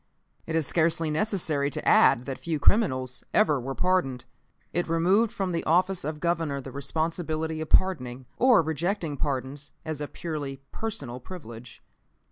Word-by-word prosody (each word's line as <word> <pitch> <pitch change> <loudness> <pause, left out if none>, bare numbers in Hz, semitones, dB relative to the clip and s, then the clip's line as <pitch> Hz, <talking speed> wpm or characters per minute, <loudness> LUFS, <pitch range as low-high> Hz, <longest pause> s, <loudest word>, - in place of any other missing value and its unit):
It 160 - -2
is 160 -2 +2
scarcely 165 0 +1
necessary 155 -6 +1
to - - -5
add 120 - +5
that 135 -2 -5
few 165 -2 -2
criminals 130 - +2
ever 150 -11 +4
were 135 +2 -4
pardoned. 135 -10 0 0.5
It 175 - 0
removed 185 +7 +3
from 195 -5 -2
the 170 - -1
office 185 +3 +2
of 150 +1 -4
Governor 165 -4 0
the 135 0 -8
responsibility 160 +2 -2
of 155 - -5
pardoning, 130 -9 +2
or 245 -8 +5
rejecting 165 +1 -1
pardons 140 0 -3
as 155 -2 -4
a 145 - -2
purely 145 -5 -5
personal 140 - -5
privilege. 120 -7 -10
155 Hz, 150 wpm, -27 LUFS, 135-175 Hz, 0.5 s, add